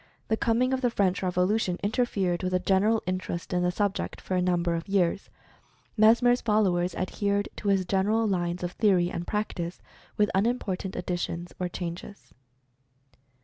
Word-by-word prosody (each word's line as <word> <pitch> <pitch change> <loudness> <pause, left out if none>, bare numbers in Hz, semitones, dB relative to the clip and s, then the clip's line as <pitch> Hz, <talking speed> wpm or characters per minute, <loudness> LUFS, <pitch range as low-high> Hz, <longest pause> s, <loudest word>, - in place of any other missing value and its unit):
The 220 - +3
coming 235 +3 +1
of 260 - 0
the 245 - +2
French 200 -4 +1
Revolution 180 +1 +1
interfered 200 -5 0
with 185 -1 -2
the - - +4
general 205 +4 +2
interest 185 -1 -3
in 180 - +1
the 180 - +2
subject 200 +2 -2
for - - -5
a 180 - +2
number 175 -1 +1
of 165 0 -3
years. 195 -1 0 0.7
Mesmer's 235 +3 +5
followers 190 -5 +1
adhered 200 +2 -1
to - - -5
his 195 -2 +2
general 210 +4 +1
lines 175 -2 -1
of 175 - -2
theory 185 -5 +2
and 175 - -5
practice, 185 -5 -3 0.4
with 210 0 +2
unimportant 195 -3 -1
additions 175 -1 -3
or 180 -1 -1
changes. 175 +3 -7
190 Hz, 155 wpm, -27 LUFS, 180-210 Hz, 0.7 s, Mesmer's